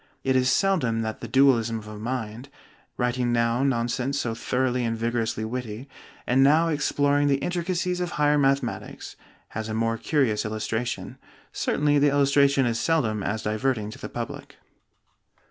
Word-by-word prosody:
It 130 Hz, -1 st, +1 dB
is 130 Hz, 0 st, +3 dB
seldom 135 Hz, -, +1 dB
that 110 Hz, 0 st, -4 dB
the -, -, -6 dB
dualism 120 Hz, -4 st, +3 dB
of 105 Hz, -1 st, -9 dB
a 105 Hz, -, -8 dB
mind 120 Hz, +1 st, -5 dB, 0.5 s
writing 125 Hz, 0 st, 0 dB
now 115 Hz, +1 st, +1 dB
nonsense 130 Hz, +1 st, 0 dB
so 115 Hz, -4 st, -2 dB
thoroughly 125 Hz, +2 st, -1 dB
and 115 Hz, -1 st, -1 dB
vigorously 115 Hz, -1 st, -1 dB
witty, 120 Hz, +1 st, -5 dB, 0.4 s
and 130 Hz, +2 st, +3 dB
now 155 Hz, +4 st, +4 dB
exploring 145 Hz, -1 st, +1 dB
the 140 Hz, -1 st, +3 dB
intricacies 180 Hz, +2 st, -2 dB
of 175 Hz, -1 st, -3 dB
higher 150 Hz, 0 st, +3 dB
mathematics 135 Hz, -3 st, -1 dB, 0.3 s
has 110 Hz, 0 st, -5 dB
a 110 Hz, -, -3 dB
more 115 Hz, 0 st, 0 dB
curious 130 Hz, -9 st, +1 dB
illustration. 110 Hz, +2 st, -3 dB, 0.3 s
Certainly 145 Hz, 0 st, +1 dB
the 145 Hz, +1 st, +4 dB
illustration 140 Hz, -1 st, +3 dB
is 115 Hz, -1 st, 0 dB
seldom 120 Hz, -11 st, +1 dB
as 110 Hz, +3 st, -2 dB
diverting 110 Hz, 0 st, -1 dB
to -, -, -11 dB
the -, -, -7 dB
public. -, -, -7 dB
125 Hz, 155 wpm, -25 LUFS, 115-140 Hz, 0.5 s, now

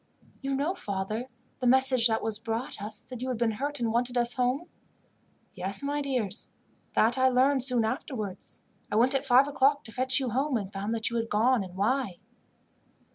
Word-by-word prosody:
"You 275 Hz, 0 st, -2 dB
know, 290 Hz, +7 st, 0 dB
father, 215 Hz, -, -4 dB, 0.3 s
the 250 Hz, -, 0 dB
message 260 Hz, -1 st, +6 dB
that 220 Hz, -1 st, -1 dB
was 220 Hz, -1 st, +1 dB
brought 225 Hz, -1 st, -4 dB
us, 210 Hz, +1 st, -3 dB
that 250 Hz, -2 st, -9 dB
you 255 Hz, -, -3 dB
had 250 Hz, -, -2 dB
been 230 Hz, -1 st, +1 dB
hurt 285 Hz, +6 st, -4 dB
and 230 Hz, -2 st, -1 dB
wanted 245 Hz, +1 st, 0 dB
us 240 Hz, 0 st, +2 dB
home?" 255 Hz, +6 st, 0 dB, 0.9 s
"Yes, 195 Hz, +5 st, -2 dB
my 290 Hz, +1 st, -1 dB
dears, 250 Hz, -8 st, -2 dB, 0.5 s
that 235 Hz, +4 st, +3 dB
I 260 Hz, 0 st, +5 dB
learned 260 Hz, +1 st, +3 dB
soon 250 Hz, -4 st, +3 dB
afterwards. 220 Hz, -, -5 dB, 0.3 s
I -, -, -1 dB
went 245 Hz, +5 st, +4 dB
at 270 Hz, 0 st, -1 dB
five 260 Hz, +2 st, +6 dB
o'clock 285 Hz, 0 st, +2 dB
to 225 Hz, -, -9 dB
fetch 260 Hz, +4 st, +2 dB
you 260 Hz, -3 st, -2 dB
home, 270 Hz, +1 st, 0 dB
and 200 Hz, -2 st, -6 dB
found 200 Hz, +3 st, -2 dB
that 225 Hz, 0 st, -2 dB
you 235 Hz, -, -1 dB
had 230 Hz, 0 st, -2 dB
gone, 230 Hz, +2 st, +2 dB
and 185 Hz, -1 st, -10 dB
why." 210 Hz, -1 st, 0 dB
245 Hz, 195 wpm, -28 LUFS, 220-265 Hz, 0.9 s, message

